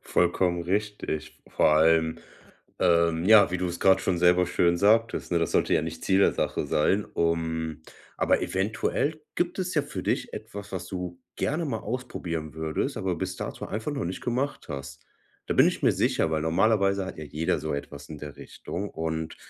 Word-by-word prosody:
Vollkommen 90 0 +1
richtig. 100 -3 -3
V - - -19
vor - - +5
allem, 80 +1 +3 0.6
ähm, 85 -1 +3
ja, 105 -2 +7
wie 90 - -1
du 90 - -1
es 85 0 -5
gerade 95 0 +5
schon 90 -2 0
selber 90 +1 +4
schön 85 -1 +2
sagtest, 110 0 +2
ne? 85 - +3
Das 85 - 0
sollte - - +2
ja - - +2
nicht 80 0 -6
Ziel 95 0 +3
der - - +5
Sache - - -1
sein, 95 +7 +2
um 80 -1 -2 0.3
aber - - +2
eventuell 110 +10 -1
gibt 175 +2 -1
es 180 -1 -2
ja 150 - +3
für 95 -9 -6
dich - - -1
etwas, 100 0 -8
was 90 -2 -4
du 90 -2 -5 0.2
gerne 155 +4 -1
mal 120 -7 -2
ausprobieren 85 - -4
würdest, 80 -1 -2
aber 95 -2 -1
bis 90 +2 -3
dato - - -5
einfach 110 +7 -3
noch 140 - -3
nicht 90 +2 -4
gemacht 125 +4 -2
hast. 70 -1 -7 0.4
Da - - -1
bin - - +6
ich - - -1
mir - - +5
sicher, 80 - +1
weil 80 - 0
normalerweise 100 +3 +2
hat 95 - -8
ja 75 - -5
jeder 75 +3 -1
so 80 -2 -3
etwas 70 0 -7
in 75 -2 -8
der 75 -1 -8
Richtung. 100 +4 -6
Und 80 0 -4
90 Hz, 195 wpm, -27 LUFS, 80-100 Hz, 0.6 s, ja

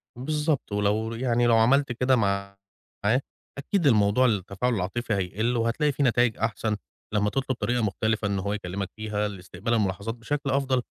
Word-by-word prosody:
بالضبط، 150 +1 -1
ولو 105 +2 0
يعني 120 0 +1
لو 115 -1 +5
عملت 135 +4 +4
كده 125 +2 +2
معاه، 100 -3 0 1.0
أكيد 155 +3 0
الموضوع 105 +1 +4
التفاعل 105 +2 0
العاطفي 110 +4 -2
هيقِل 105 +5 0
وهتلاقي 115 +6 +1
فيه 140 +1 -1
نتايج 120 -2 +3
أحسن 110 -1 -1 0.4
لمّا 105 0 +2
تطلُب 130 +3 -1
طريقة 120 0 0
مختلفة 110 +1 0
إن 100 -1 -1
هو 100 +2 -2
يكلِّمك 100 -1 -4
فيها 105 -1 -2
لاستقبال 100 +3 -4
الملاحظات 105 +1 -1
بشكل 140 +4 -3
أفضل، 135 -2 +1
115 Hz, 155 wpm, -26 LUFS, 100-125 Hz, 1.0 s, لو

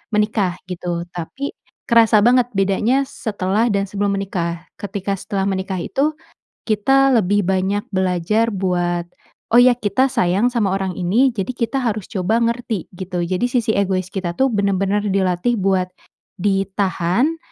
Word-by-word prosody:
menikah, 210 -4 +1
gitu, 175 -1 -3
tapi 225 +12 -5 0.4
kerasa 230 -3 +5
banget 245 +1 +4
bedanya 200 +7 +2
setelah 215 -3 -1
dan 200 -3 +1
sebelum 200 +1 -1
menikah. 170 -3 -3 0.2
Ketika 200 -1 -3
setelah 195 0 -2
menikah 190 -1 -2
itu, 290 - -1 0.5
kita 270 +5 +3
lebih 205 -3 +2
banyak 190 +2 0
belajar 190 +5 +1
buat, 175 -3 -1 0.5
"Oh - - +9
iya 250 +1 +7
kita 245 +4 +1
sayang 195 +7 +2
sama 210 -6 +1
orang 195 -1 -2
ini, 220 +10 +3
jadi 210 0 -3
kita 240 +3 -1
harus 220 -6 -3
coba 215 +5 +1
ngerti." 230 -5 -2
Gitu. 180 -1 -4
Jadi 185 +6 -1
sisi 240 -3 0
egois 190 -3 0
kita 180 -3 -3
tuh 265 +4 +2
benar-benar 200 0 0
dilatih 190 +3 +1
buat 190 -3 +1 0.5
ditahan 195 - 0
200 Hz, 140 wpm, -20 LUFS, 185-230 Hz, 0.5 s, Oh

